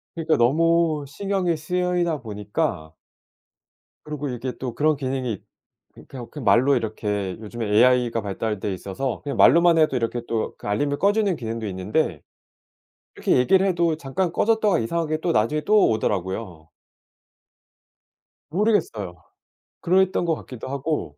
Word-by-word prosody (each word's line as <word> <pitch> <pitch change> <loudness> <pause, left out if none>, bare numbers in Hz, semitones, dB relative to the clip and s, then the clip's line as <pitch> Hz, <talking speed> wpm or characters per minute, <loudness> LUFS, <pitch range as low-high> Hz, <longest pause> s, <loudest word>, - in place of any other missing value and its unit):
그러니까 165 -1 +1
너무 160 +4 +2
신경이 190 +1 -1
쓰이다 175 -2 -1
보니까 105 - -3 1.1
그러고 150 -2 -5
이게 125 +1 -4
또 125 -3 -4
그런 155 0 +2
기능이 130 -5 -3 0.6
이 - - -13
그냥 125 -3 -8 0.2
말로 120 +7 +4
이렇게 105 -4 -2
요즘에 110 +1 -5
AI가 120 0 +3
발달돼 100 0 -3
있어서 100 +8 -4
그냥 145 - -4
말로만 170 0 +6
해도 155 -4 +3
이렇게 120 0 -1
또 115 -1 -2
그 - - -9
알림을 140 +8 0
꺼주는 205 0 +2
기능도 115 -2 -5
있는데 95 - -1 0.9
이렇게 - - +1
얘기를 190 +10 +4
해도 170 -4 +1
잠깐 165 +4 -2
꺼졌다가 215 -4 +2
이상하게 155 +6 -1
또 170 -1 0
나중에 115 +8 +1
또 210 +5 +4
오더라고요. 95 -5 -3 1.8
모르겠어요. 155 - -1 0.6
그랬던 185 0 +2
것 165 -2 +1
같기도 125 -4 -9
하고. 140 - -3
135 Hz, 315 characters per minute, -23 LUFS, 110-170 Hz, 1.8 s, 말로만